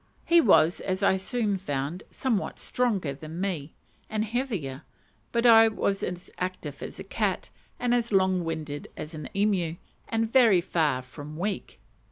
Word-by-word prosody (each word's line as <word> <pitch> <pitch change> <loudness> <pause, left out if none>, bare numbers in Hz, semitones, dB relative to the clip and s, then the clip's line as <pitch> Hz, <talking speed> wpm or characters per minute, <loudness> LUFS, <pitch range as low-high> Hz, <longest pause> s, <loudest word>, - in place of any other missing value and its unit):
He 340 0 +6
was, 175 - +5
as 190 +1 -2
I 190 - +5
soon 205 0 -1
found, 145 +1 -3
somewhat 235 -7 -1
stronger 205 - 0
than 155 +4 -8
me, 170 -6 -3 0.3
and 215 0 -1
heavier; 210 - -3 0.5
but 235 0 +1
I 225 -1 +8
was 200 -2 -1
as 180 0 -5
active 180 -6 -4
as - - -7
a - - -5
cat, 195 -1 -2 0.3
and 245 0 +1
as 235 -1 +1
long 190 -2 +3
winded 155 -3 -4
as 155 - -6
an 155 -3 -7
emu, 195 -5 +1 0.3
and 225 0 +1
very 230 -6 +5
far 155 -7 0
from 145 +4 -9
weak. 195 +3 -3
190 Hz, 160 wpm, -27 LUFS, 160-220 Hz, 0.5 s, I